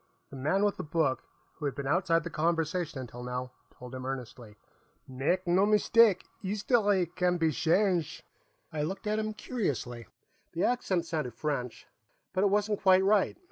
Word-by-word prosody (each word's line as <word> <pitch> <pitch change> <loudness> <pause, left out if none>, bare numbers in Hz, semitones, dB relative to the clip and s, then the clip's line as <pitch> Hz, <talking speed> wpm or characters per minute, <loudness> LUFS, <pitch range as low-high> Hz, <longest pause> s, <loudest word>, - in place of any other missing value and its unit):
_" - - -43
the - - -9
man 155 +10 +1
with 205 - 0
the - - -4
book, 155 -4 0 0.4
who 150 - -5
had 140 - -2
been 140 - -5
outside 165 +2 +2
the 170 - -5
conversation 165 -1 -1
until 120 -1 -8
now, 125 0 -4 0.2
told 125 0 -12
him 130 0 -6
earnestly. 125 -4 -7 0.5
"Make 140 +9 -1
no 180 +2 +3
mistake; 215 -1 +4 0.2
'istoree 205 -1 +2
can 180 +1 0
be 165 -2 +2
shange'!" 175 +1 +1 0.5
I 155 - -2
looked 190 +7 -4
at 215 +1 0
him 215 0 -3
curiously. 135 - -3 0.5
The 170 - -1
accent 195 -8 +1
sounded 150 -8 -3
French, 125 -4 -3 0.5
but 185 - +1
it 205 - +4
wasn't 210 +1 0
quite 190 -1 +5
right. 200 0 +2
170 Hz, 170 wpm, -30 LUFS, 135-195 Hz, 0.5 s, quite